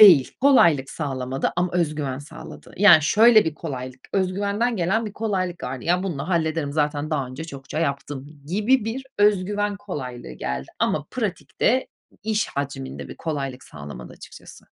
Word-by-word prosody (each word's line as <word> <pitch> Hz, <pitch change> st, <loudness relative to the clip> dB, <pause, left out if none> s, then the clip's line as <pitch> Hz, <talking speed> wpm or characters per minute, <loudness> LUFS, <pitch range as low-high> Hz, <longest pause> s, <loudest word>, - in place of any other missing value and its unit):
Değil, 175 Hz, -11 st, +9 dB
kolaylık 170 Hz, -, +5 dB
sağlamadı 135 Hz, -3 st, -2 dB
ama 180 Hz, 0 st, 0 dB
öz 170 Hz, -4 st, +1 dB
güven 140 Hz, -4 st, -3 dB
sağladı. 145 Hz, +2 st, -11 dB
Yani, 180 Hz, -5 st, +8 dB
şöyle 215 Hz, -, +6 dB
bir 160 Hz, -, -2 dB
kolaylık: 130 Hz, -5 st, -6 dB
Öz 190 Hz, -2 st, +1 dB
güvenden 205 Hz, +4 st, 0 dB
gelen 195 Hz, +5 st, +1 dB
bir 210 Hz, -, -6 dB
kolaylık 185 Hz, -5 st, -2 dB
vardı; 125 Hz, 0 st, -5 dB
"Ya, 180 Hz, +2 st, +2 dB
bununla 155 Hz, -6 st, -3 dB
hallederim, 160 Hz, -4 st, 0 dB
zaten 150 Hz, 0 st, 0 dB
daha 140 Hz, -4 st, 0 dB
önce 130 Hz, +5 st, -7 dB
çokça 140 Hz, -1 st, -7 dB
yaptım." 140 Hz, -2 st, -2 dB, 0.2 s
gibi 210 Hz, -, +2 dB
bir 240 Hz, +4 st, -3 dB
öz 205 Hz, -2 st, +4 dB
güven 205 Hz, +1 st, -1 dB
kolaylığı 130 Hz, -, -6 dB
geldi 65 Hz, +1 st, -4 dB
ama 145 Hz, -, 0 dB
pratikte 240 Hz, +3 st, 0 dB, 0.4 s
iş 215 Hz, 0 st, 0 dB
hacminde 135 Hz, -1 st, -5 dB
bir -, -, -9 dB
kolaylık 140 Hz, -5 st, -4 dB
sağlamadı 70 Hz, -4 st, -9 dB
açıkçası. -, -, -13 dB
160 Hz, 160 wpm, -23 LUFS, 135-205 Hz, 0.4 s, Değil